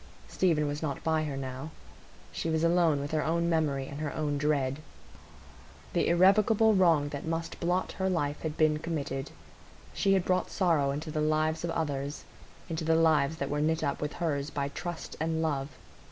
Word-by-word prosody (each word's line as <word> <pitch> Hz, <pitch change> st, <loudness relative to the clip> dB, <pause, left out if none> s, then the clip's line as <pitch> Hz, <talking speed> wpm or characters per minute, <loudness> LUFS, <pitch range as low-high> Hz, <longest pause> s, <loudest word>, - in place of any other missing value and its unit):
Stephen 165 Hz, -5 st, +1 dB
was 145 Hz, 0 st, -3 dB
not 145 Hz, -4 st, -3 dB
by 160 Hz, -1 st, +1 dB
her 140 Hz, -3 st, -4 dB
now; 130 Hz, +2 st, -5 dB, 0.6 s
she 165 Hz, -, -3 dB
was 160 Hz, 0 st, 0 dB
alone 170 Hz, -3 st, +3 dB
with 145 Hz, +1 st, -4 dB
her 155 Hz, -1 st, +1 dB
own 170 Hz, +1 st, +1 dB
memory 150 Hz, -5 st, +1 dB
and 145 Hz, -, -7 dB
her 150 Hz, -2 st, -2 dB
own 150 Hz, -2 st, -1 dB
dread. 140 Hz, -2 st, 0 dB, 1.1 s
The -, -, +2 dB
irrevocable 205 Hz, +5 st, +5 dB
wrong 165 Hz, -7 st, +4 dB
that 140 Hz, -1 st, -5 dB
must 165 Hz, +1 st, -3 dB
blot 180 Hz, +2 st, 0 dB
her 190 Hz, 0 st, -1 dB
life 145 Hz, -5 st, -1 dB
had 155 Hz, -1 st, -4 dB
been 155 Hz, -1 st, +3 dB
committed; 140 Hz, -4 st, -3 dB, 0.6 s
she 195 Hz, -1 st, +2 dB
had 190 Hz, -2 st, +2 dB
brought 185 Hz, 0 st, +1 dB
sorrow 165 Hz, -7 st, +2 dB
into 150 Hz, +3 st, -3 dB
the 155 Hz, -, -1 dB
lives 155 Hz, +1 st, +1 dB
of 170 Hz, -, -1 dB
others,—into 155 Hz, +2 st, -5 dB
the 160 Hz, +1 st, +3 dB
lives 160 Hz, -2 st, +3 dB
that 140 Hz, -2 st, -3 dB
were 145 Hz, 0 st, 0 dB
knit 160 Hz, +1 st, +1 dB
up 140 Hz, -2 st, -1 dB
with 150 Hz, 0 st, -2 dB
hers 145 Hz, -4 st, -2 dB
by 140 Hz, -1 st, -2 dB
trust 175 Hz, +3 st, -6 dB
and 160 Hz, +1 st, 0 dB
love. 140 Hz, -3 st, -1 dB
155 Hz, 180 wpm, -29 LUFS, 145-165 Hz, 1.1 s, irrevocable